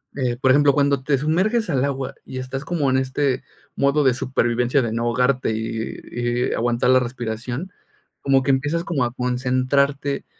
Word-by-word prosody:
eh, 125 -3 -1
por 130 - +4
ejemplo, 145 +1 +5
cuando 140 -2 +1
te 140 -1 +2
sumerges 185 - +1
al 135 -2 +1
agua 135 -1 -3
y 130 - -6
estás 135 +2 -5
como 150 -4 0
en 130 - +2
este 130 0 0 0.3
modo 140 +2 +2
de 130 - +4
supervivencia 125 +1 +1
de 115 -2 -2
no 115 0 -1
ahogarte 125 +1 +1
y 110 0 -3 0.2
y 120 0 -1
y - - -2
aguantar 120 +1 +1
la 130 0 +6
respiración, 120 +6 -4 0.5
como 135 -1 +3
que 140 - +2
empiezas 145 +5 0
como 140 -8 0
a 120 - -4
concentrarte, 130 +3 0
130 Hz, 180 wpm, -22 LUFS, 125-140 Hz, 0.5 s, la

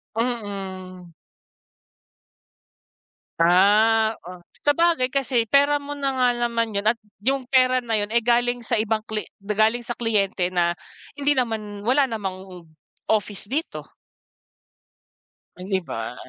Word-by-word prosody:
Mm. 195 -6 -4 2.3
Ah. 215 +6 +4
Oh, 180 -1 -10 0.2
sabagay 330 -3 +3
kasi 260 -3 0
pera 285 +4 +4
mo 290 0 -7
na 275 -1 -1
nga 255 -1 +2
naman 230 -2 -1
yun 200 - 0
at 220 +2 +2 0.2
yung 265 0 0
pera 255 -1 +4
na 230 -3 -2
yun 205 0 -1
ay 235 - +3
galing 245 +1 +1
sa 235 0 -2
ibang 220 0 +1
kli 215 -1 -3 0.2
galing 215 +4 +1
sa 240 0 -6
kliyente 195 -5 0
na 175 -1 +1 0.4
hindi 290 0 +1
naman, 215 -4 -3
wala 275 +3 +4
namang 190 -7 -6 0.4
office 205 -2 -1
dito. 295 +8 -4 1.7
O, - - -11
di 190 -2 +1
ba? 115 -6 -6
225 Hz, 125 wpm, -23 LUFS, 200-250 Hz, 2.3 s, Ah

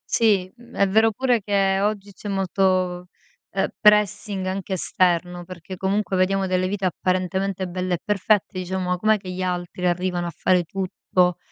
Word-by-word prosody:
Sì, 205 -5 +3 0.3
è 200 - +2
vero 220 +3 +4
pure 245 +1 +1
che 195 -1 +1
oggi 205 -1 -1
c'è 205 - -8
molto, 185 -2 0 0.4
ehm, - - 0
pressing 210 -2 +3
anche 190 +1 -3
esterno, 180 -1 0
perché 185 +1 -9
comunque 195 +2 -1
vediamo 190 +1 +2
delle 185 0 0
vite 195 0 -2
apparentemente 185 +1 -1
belle 180 0 -2
e - - -4
perfette, 205 -2 +1
diciamo: 180 0 -2
"Com'è 215 +3 +3
che 190 -2 -8
gli 180 +1 -5
altri 180 0 -2
arrivano 175 0 -1
a - - -2
fare 175 +2 +1
tutto?" 180 -1 0
185 Hz, 155 wpm, -23 LUFS, 180-200 Hz, 0.4 s, vero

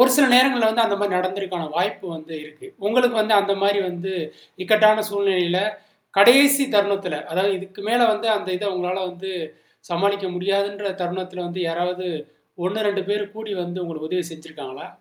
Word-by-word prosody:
ஒரு 255 +1 +7
சில 285 -2 +6
நேரங்கள்ல 250 -3 +5
வந்து 230 +1 +2
அந்த 200 -2 0
மாரி 205 -1 0
நடந்திருக்க 185 -2 -3
வாய்ப்பு 180 +2 -2
வந்து 160 +1 -11
இருக்கு. 155 - -15 0.2
உங்களுக்கு 245 +2 +3
வந்து 215 0 +2
அந்த 200 0 0
மாரி 200 0 +3
வந்து 175 +2 -6 0.5
இக்கட்டான 215 +2 +5
சூழ்நிலையில, 185 -3 +1 0.6
கடைசி 275 +6 +7
தருணத்தில, 200 -4 +1 0.2
அதாவது 190 +4 +1
இதுக்கு 190 +1 -11
மேல 240 +1 +3
வந்து 215 +2 -3
அந்த 195 - -6
இத 210 - -5
உங்களால 180 +1 -2
வந்து, 180 +2 -8 0.6
சமாளிக்க 200 +2 0
முடியாதுன்ற 200 +2 -1
தருணத்தில 180 0 -5
வந்து 180 +2 -6
யாராவது, 180 +2 -3 0.6
1, 210 +4 -1
2 200 -1 -2
பேரு 205 0 0
கூடி 220 -1 -6
வந்து 175 +1 -5
உங்களுக்கு 155 -2 -7
உதவி 180 -1 -1
செஞ்சுருக்காங்களா? 155 -4 -10
195 Hz, 160 wpm, -22 LUFS, 180-210 Hz, 0.6 s, ஒரு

